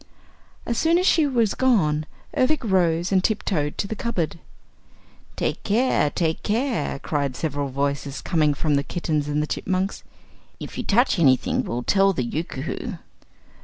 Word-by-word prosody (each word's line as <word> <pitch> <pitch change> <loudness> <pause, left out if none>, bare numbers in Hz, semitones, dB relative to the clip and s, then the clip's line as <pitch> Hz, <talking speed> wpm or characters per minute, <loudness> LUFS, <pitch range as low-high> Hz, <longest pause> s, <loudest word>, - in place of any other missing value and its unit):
As 235 - -1
soon 330 +1 +3
as 365 - +1
she 320 -5 +4
was 235 -6 +1
gone, 155 -13 +2 0.3
Ervic 265 +3 +2
rose 175 -4 +1
and 190 -1 +3
tiptoed 185 -9 -1
to - - -1
the 220 - -4
cupboard. 175 -8 -2 1.0
"Take - - -2
care! 225 - +2
Take 160 +1 -1
care!" 225 - -1
cried 140 -2 -2
several 145 -2 -2
voices, 140 +1 -2
coming 150 -3 +1
from 150 0 +1
the 140 - 0
kittens 155 -4 -2
and 150 +1 0
chipmunks. 190 +4 -2 0.6
"If - - -8
you - - -2
touch 230 -2 +2
anything 130 -6 +3
we'll 120 +1 -3
tell 195 +4 +3
the 130 - -1
Yookoohoo!" 160 - -4
170 Hz, 150 wpm, -23 LUFS, 145-220 Hz, 1.0 s, she